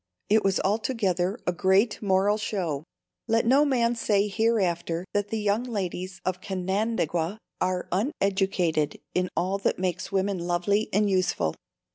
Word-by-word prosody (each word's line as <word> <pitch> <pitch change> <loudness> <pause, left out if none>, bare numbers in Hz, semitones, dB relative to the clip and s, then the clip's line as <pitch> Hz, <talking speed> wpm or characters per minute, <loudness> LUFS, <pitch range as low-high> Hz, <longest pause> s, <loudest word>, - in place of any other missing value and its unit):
It 215 +1 +4
was 195 -1 +2
altogether 200 -3 0
a 180 - +1
"great 190 +5 +2
moral 200 +1 +2
show." 170 -9 -2 0.4
Let 225 0 +2
no 270 +5 +5
man 240 -5 +2
say 210 -3 +1
hereafter 190 -6 0
that 205 0 0
the 225 - -3
young 210 +1 +1
ladies 185 -5 -4
of 185 0 -1
Canandaigua 190 -2 -1 0.2
are 185 -1 0
uneducated 190 - 0
in 180 0 0
all 185 +4 0
that - - 0
makes 185 +1 -2
women 195 -1 0
lovely 175 +5 0
and 205 +2 +2
useful. 185 - +1
195 Hz, 140 wpm, -26 LUFS, 180-215 Hz, 0.4 s, no